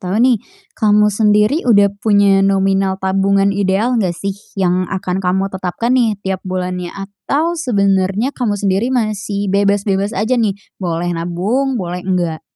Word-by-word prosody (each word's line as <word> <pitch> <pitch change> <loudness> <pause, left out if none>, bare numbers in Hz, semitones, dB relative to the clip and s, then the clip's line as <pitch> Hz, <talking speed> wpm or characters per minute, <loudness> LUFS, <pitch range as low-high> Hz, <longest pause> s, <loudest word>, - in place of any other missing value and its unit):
tahu 185 +2 -3
nih, 240 -1 +3 0.3
kamu 210 -2 +3
sendiri 210 - +2
udah 200 -3 +5
punya 200 -2 +3
nominal 195 0 +1
tabungan 195 +1 +1
ideal 200 +4 0
enggak 180 -4 -1
sih 195 +2 -3 0.2
yang 185 -1 0
akan 190 -1 -3
kamu 190 +1 -1
tetapkan 190 +6 -2
nih 235 -5 +2
tiap 190 -1 -2
bulannya? 180 -1 -4
Atau 240 +12 -2
sebenarnya 200 - 0
kamu 235 -7 -1
sendiri 200 +3 0
masih 205 -5 -2
bebas-bebas 200 0 +1
aja 230 +5 +1
nih? 205 -3 0 0.2
Boleh 175 -1 -2
nabung, 195 +11 -1
boleh 180 -3 -4
enggak? 175 -4 -2
195 Hz, 145 wpm, -16 LUFS, 190-215 Hz, 0.3 s, udah